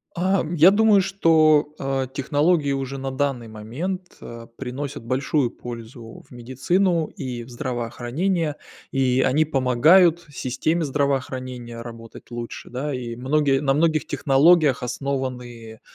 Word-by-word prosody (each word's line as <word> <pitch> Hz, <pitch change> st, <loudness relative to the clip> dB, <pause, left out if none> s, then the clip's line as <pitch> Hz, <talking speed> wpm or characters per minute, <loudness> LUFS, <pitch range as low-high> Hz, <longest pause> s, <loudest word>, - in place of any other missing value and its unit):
Ам, 180 Hz, -2 st, 0 dB
я 170 Hz, +4 st, +7 dB
думаю, 210 Hz, -1 st, +4 dB
что, 155 Hz, -5 st, +3 dB
э, 135 Hz, -1 st, -1 dB
технологии, 145 Hz, +2 st, +1 dB
уже, 135 Hz, 0 st, -3 dB
на 135 Hz, 0 st, -4 dB
данный 130 Hz, -3 st, -2 dB
момент, 155 Hz, -, -6 dB
э, 115 Hz, 0 st, -9 dB
приносят 135 Hz, 0 st, -6 dB
большую 130 Hz, +1 st, 0 dB
пользу 115 Hz, -1 st, -10 dB
в -, -, -21 dB
медицину 155 Hz, +8 st, 0 dB
и 125 Hz, -4 st, -6 dB
в 125 Hz, -, -15 dB
здравоохранение. 130 Hz, +7 st, -2 dB, 0.3 s
И 130 Hz, -1 st, +1 dB
они 145 Hz, +5 st, +3 dB
помогают 155 Hz, +6 st, +4 dB
системе 155 Hz, +6 st, -1 dB
здравоохранения 130 Hz, -4 st, -3 dB
работать 115 Hz, 0 st, -11 dB
лучше, 120 Hz, -1 st, -7 dB
да, 140 Hz, +4 st, -3 dB
и 120 Hz, -2 st, -5 dB
многие 135 Hz, +1 st, +1 dB
на 135 Hz, -2 st, +1 dB
многих 155 Hz, 0 st, +1 dB
технологиях 145 Hz, 0 st, +3 dB
основаны 125 Hz, -4 st, -5 dB
135 Hz, 125 wpm, -23 LUFS, 125-155 Hz, 0.3 s, я